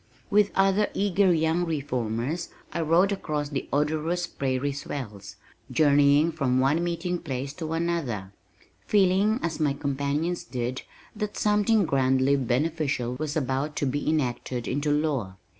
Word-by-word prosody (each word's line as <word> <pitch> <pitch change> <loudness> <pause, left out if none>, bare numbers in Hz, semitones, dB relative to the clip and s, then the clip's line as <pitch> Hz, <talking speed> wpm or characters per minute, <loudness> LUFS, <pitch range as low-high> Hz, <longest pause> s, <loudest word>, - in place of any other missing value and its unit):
With 205 0 +4
other 195 +2 +3
eager 200 -1 +3
young 160 +1 +2
reformers, 140 -1 -2 0.2
I 170 - -1
rode 170 +5 +3
across 150 -7 -2
the 140 -2 -4
odorous 155 +4 0
prairie 135 -2 -2
swells, 110 -8 -7 0.3
journeying 145 +1 +4
from 135 -5 0
one 145 +6 +2
meeting 175 +1 -2
place 135 0 -4
to 160 0 -3
another, 160 - -2 0.6
feeling 205 +3 +3
as 170 -1 -2
my 150 -3 +2
companions 140 +5 -2
did 125 0 -3 0.3
that 210 -1 -4
something 210 0 +3
grandly 135 -1 +2
beneficial 135 0 0
was 155 0 -2
about 135 +1 -1
to - - -1
be 145 +3 -1
enacted 125 -4 -1
into 145 +3 -1
law. 145 -10 0
150 Hz, 135 wpm, -26 LUFS, 135-170 Hz, 0.6 s, With